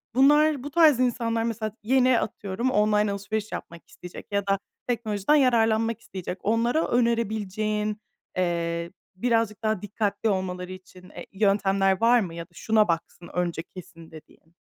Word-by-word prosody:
bunlar, 295 +1 +4
bu 290 - -6
tarz 310 -6 +5
insanlar 230 -2 0
mesela, 220 -2 -2
yeni, 255 +1 +3
atıyorum, 210 +5 -3
online 210 -1 +2
alışveriş 210 +2 -4
yapmak 170 0 -8
isteyecek 180 - -11
ya 200 0 -1
da 195 0 +2 0.3
teknolojiden 225 +1 +1
yararlanmak 230 -4 +2
isteyecek. 185 0 -6
Onlara 235 +8 +1
önerebileceğin, 215 -2 -1 0.4
eee, 170 -1 -1 0.2
birazcık 225 0 0
daha 215 -3 0
dikkatli 210 +1 -1
olmaları 185 -1 -3
için, 185 0 -13
eee, - - -10
yöntemler 195 -1 +2
var 240 +1 +5
mı? 180 -7 -4
Ya 170 - -5
da - - -35
"Şuna 215 +3 +2
baksın 170 +1 -3
önce 175 -2 -2
kesin," 175 -2 -13
dediğin? 160 +1 -16
210 Hz, 145 wpm, -25 LUFS, 185-230 Hz, 0.4 s, tarz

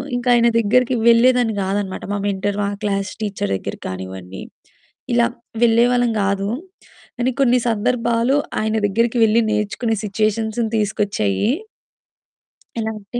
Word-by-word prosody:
ఇంకా 245 0 -1
ఆయన 235 0 +4
దగ్గరికి 250 +3 +2
వెళ్ళేదాన్ని 235 -1 +4
కాదనమాట. 195 0 -3
మా - - -1
మెంటర్, 200 +1 -2
మా - - 0 0.2
క్లాస్ 200 -1 -1
టీచర్ 195 - -2
దగ్గరికి - - -6
కానివ్వండి, 95 0 -7 0.7
ఇలా 235 0 +4 0.4
వెళ్ళేవాళ్ళం 240 +1 +3
కాదు. 200 +1 -1 0.7
కానీ 255 +2 +1
కొన్ని 250 -1 +4
సందర్భాలు 235 +3 +1 0.3
ఆయన 220 0 0
దగ్గరికెళ్లి 230 +1 +2
నేర్చుకునే 215 +2 -1
సిచ్యుయేషన్స్‌ను 220 +2 -1
తీసుకొచ్చాయి. 205 - 0 1.3
ఎలా 220 0 -2
అంటే? 225 +5 -6
220 Hz, 115 wpm, -20 LUFS, 200-235 Hz, 1.3 s, ఆయన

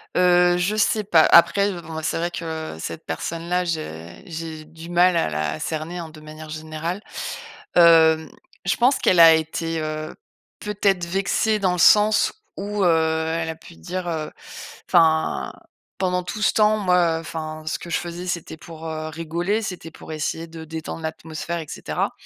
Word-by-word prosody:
Heu, 180 -1 +4
je 180 +4 0
sais 215 0 +2
pas. 170 -5 +5
Après, 200 +4 +6
bon, 170 -3 -8
ben 160 - -3
c'est 160 - -1
vrai 170 +1 -2
que 160 - -5
cette 80 0 -6
personne-là, 170 - -2
je 85 - -5
j'ai 160 -2 -7
du 160 +2 -12
mal 175 +1 +4
à 165 - +1
la 75 0 -2
cerner, 160 +2 -4
hein, 165 -2 -6
de 155 0 -13
manière 155 0 -11
générale, 155 +4 -5 0.7
hem, 160 -2 +6 0.4
je 180 - +2
pense 250 +3 +4
qu'elle 180 - +3
a 165 -1 +10
été, 160 +1 -2
heu, 155 0 -4 0.5
peut-être 200 -3 0
vexée. 195 +4 0
Dans 190 -3 +1
le - - -2
sens 210 +4 +5 0.2
où, 205 0 -2
heu, - - +5 0.5
elle 165 -1 -2
a 160 - -4
pu 160 - -15
dire, 180 - -5
heu: 155 -2 -3 0.6
«Enfin, 160 -1 +2 0.4
pendant 180 -1 0
tout 195 +4 -6
ce - - +3
temps, 215 0 +4
moi 180 -4 +2
enfin 155 -1 -6
ce 155 - -1
que 170 - -9
je - - +1
faisais, 175 +1 -6
c'était 170 -3 -4
pour, 165 0 -10
heu, 155 0 -4
rigoler, 170 +6 -2
c'était 180 -6 -6
pour 160 - -11
essayer 160 +2 -3
de 160 -1 -10
détendre 160 +1 -6
l'atmosphère, 160 +1 -5
et 160 - -7
cetera.» - - -3
165 Hz, 175 wpm, -22 LUFS, 160-180 Hz, 0.7 s, a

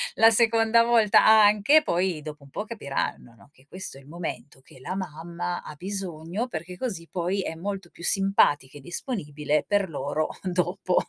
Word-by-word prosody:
la 225 - +7
seconda 225 0 +4
volta 230 -3 +4
anche, 215 +7 +6
poi 175 - 0
dopo 150 -1 -9
un 140 - -15
po' 205 - -5
capiranno, 140 - -4
no, - - -20
che 130 -2 -25
questo 185 -4 -7
è - - -13
il 135 - -19
momento 155 -4 -7
che 130 - -17
la 160 +8 -5
mamma 175 0 -5
ha - - -8
bisogno, 185 - -4
perché 175 -2 -7
così 185 -10 -4
poi 185 +2 -1
è 165 - -4
molto 195 +1 -5
più 170 - -14
simpatica 175 -9 +2
e 145 - -12
disponibile 150 - -2
per 200 -2 +1
loro 155 0 -2
dopo. 180 0 -1
180 Hz, 175 wpm, -26 LUFS, 155-205 Hz, -, la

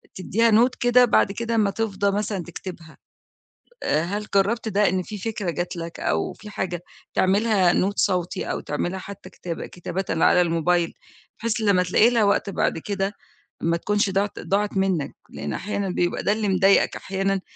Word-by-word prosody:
تديها 225 +5 +1
note 235 +4 +4
كده 245 +1 +5
بعد 215 - +3
كده 230 +3 -2
أما 210 -3 +2
تفضى 200 -2 0
مثلًا 205 -3 -2
تكتبها 170 -1 -9 0.9
آآ، 155 - +2
هل 205 +5 -3
جرّبت 215 +4 +2
ده 205 0 +3
إن 185 +1 -1
في 210 +3 -7
فكرة 205 -2 -3
جات 175 +2 -3
لك 170 0 -6
أو 80 0 -1
في 210 - -12
حاجة 175 -4 -4 0.3
تعملها 195 -1 +3
note 195 +2 +1
صوتي 180 -3 0
أو - - -2
تعملها 175 +5 -3
حتى 200 +1 -10
كتابة 170 -2 -6
كتابةً 180 +2 -5
على 170 +2 +4
الmobile، 170 0 +1 0.5
بحيث 230 0 -1
لما 200 -4 +3
تلاقي 185 +6 +4
لها 235 -3 +2
وقت 200 0 +2
بعد 195 - 0
كده 195 +3 -2 0.5
ما 170 +1 +1
تكونش 205 +3 +1
ضاعِت 195 +2 -1
ضاعِت 205 0 -1
منك 185 -7 0
لأن 75 - -5
أحيانًا 200 -1 -3
بيبقى 175 -1 -1
ده - - +2
اللي 215 -1 0
مضايقك 195 +1 +4
أحيانًا 195 0 -1
195 Hz, 170 wpm, -24 LUFS, 180-210 Hz, 0.9 s, كده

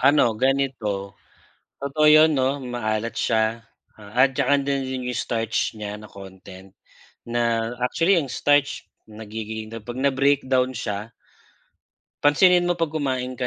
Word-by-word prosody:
ano, 135 -3 +4
ganito, 130 -8 -1 0.7
totoo 140 +2 0
yun, 155 0 +6
'no, 135 +2 0
maalat 115 -3 -3
siya 110 +1 0 0.3
at 125 +6 +1
tsaka 145 0 +2
dun 140 -1 -1
din 130 -1 -4
yung 125 - -3
starch 115 -2 -1
niya 105 -1 -6
na 105 - -13
content, 95 -1 -13 0.5
na 115 -1 0 0.2
actually 170 +9 +2
ang 140 -7 -1
starch 145 0 +1 0.2
nagiging 110 0 -7 0.2
pag 120 +1 -6
na 140 - +3
breakdown 130 -1 +1
siya 110 -2 -5 1.1
Pansinin 175 +5 +5
mo, 175 - +1
pag 165 -3 -2
kumain 130 -5 -3
ka 125 - -1
125 Hz, 135 wpm, -23 LUFS, 110-140 Hz, 1.1 s, yun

